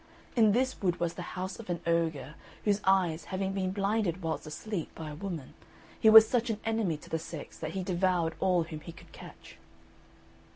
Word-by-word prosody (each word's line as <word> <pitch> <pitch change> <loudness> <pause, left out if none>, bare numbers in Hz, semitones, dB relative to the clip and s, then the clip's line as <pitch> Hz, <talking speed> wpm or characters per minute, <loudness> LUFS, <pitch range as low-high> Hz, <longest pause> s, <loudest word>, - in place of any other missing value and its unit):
In 220 -4 +5
this 255 +3 0
wood 180 -3 0
was 170 -1 -1
the - - -7 0.2
house 185 +3 -4
of 220 - -10
an 175 -1 -1
ogre 165 -3 0 0.3
whose 205 -1 +2
eyes 180 -4 +2
having 190 0 -2
been 190 -1 -1
blinded 195 -2 0
whilst 160 -1 -3
asleep 180 +3 -4
by 155 -2 -6
a - - -7
woman, 165 -5 -6 0.5
he 220 - +6
was 220 0 +10
such 240 0 0
an 215 -2 -1
enemy 220 -8 0
to - - -15
the 160 - 0
sex 160 -2 -8
that 155 +1 -4
he 190 - -2
devoured 180 -2 +1
all 180 -3 +3
whom 160 -1 -7
he 165 +2 -10
could - - -16
catch. - - -13
185 Hz, 200 wpm, -30 LUFS, 165-205 Hz, 0.5 s, was